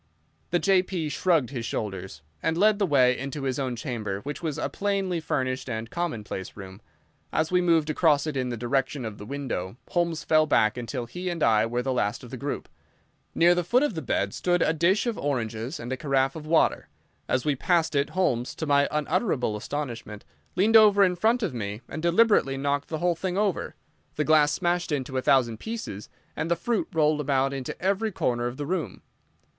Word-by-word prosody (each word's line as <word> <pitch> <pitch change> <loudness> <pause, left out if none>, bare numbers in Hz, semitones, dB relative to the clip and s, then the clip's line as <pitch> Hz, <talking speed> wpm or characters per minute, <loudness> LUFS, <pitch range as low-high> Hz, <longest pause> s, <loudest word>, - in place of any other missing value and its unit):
The 175 - +2
J.P. 185 -4 +1
shrugged 155 -5 +1
his 125 -4 -4
shoulders, 95 -8 -5 0.2
and 160 - 0
led 210 +2 +4
the 200 - +2
way 130 -4 +4
into 140 +2 -5
his 130 0 -1
own 130 -3 -2
chamber, 110 -6 -4
which 145 +4 -6
was 160 -3 -3
a - - -1
plainly 195 -3 -1
furnished 130 -4 -2
and 110 0 -4
commonplace 110 - -4
room. 95 0 -10 0.5
As 160 +1 0
we 180 0 +3
moved 165 -3 +3
across 150 -2 +3
it 155 -2 -3
in 130 -1 -1
the 120 - -3
direction 130 +2 -1
of 110 -2 -6
the 105 - -9
window, 125 -8 -4
Holmes 170 -3 0
fell 155 -1 +3
back 110 -7 +3
until 120 0 -4
he 180 +10 -5
and 170 -3 -2
I 110 -1 +4
were 120 +1 -2
the 130 0 -1
last 115 +1 -1
of 120 - -11
the 130 - -5
group. 140 +3 -4 0.7
Near 170 +1 +5
the 175 0 0
foot 245 - +3
of 295 - 0
the 160 - -4
bed 100 -7 -1
stood 175 -1 +1
a 160 - +2
dish 175 +7 +2
of 235 -3 -2
oranges 120 0 -3
and 120 +2 -4
a - - -3
carafe 135 -2 +1
of 155 -1 -8
water. 160 0 +2 0.4
As 130 - 0
we 150 -2 +2
passed 165 +4 +1
it 140 0 +1
Holmes, 130 -10 0
to 160 - -4
my 140 -1 +3
unutterable 150 - 0
astonishment, 115 -3 -5 0.3
leaned 210 +5 +3
over 210 -2 +7
in 180 -2 +3
front 225 +6 +2
of 180 -10 -1
me 105 -2 -4
and 155 - -6
deliberately 170 -6 +3
knocked 140 +1 -1
the 160 - -3
whole 175 +2 +1
thing 180 +2 -3
over. 200 -4 -1 0.4
The 150 - 0
glass 155 -1 +5
smashed 175 -2 0
into 135 -2 -2
a - - +1
thousand 120 -5 +2
pieces 220 - -6 0.3
and 160 - -2
the 170 - +3
fruit 225 +6 -1
rolled 155 -3 +2
about 135 -1 +1
into 135 -2 -5
every 200 +4 0
corner 120 -8 -1
of 120 +1 -6
the 145 - -4
room. 175 +1 -3
145 Hz, 205 wpm, -26 LUFS, 125-175 Hz, 0.7 s, over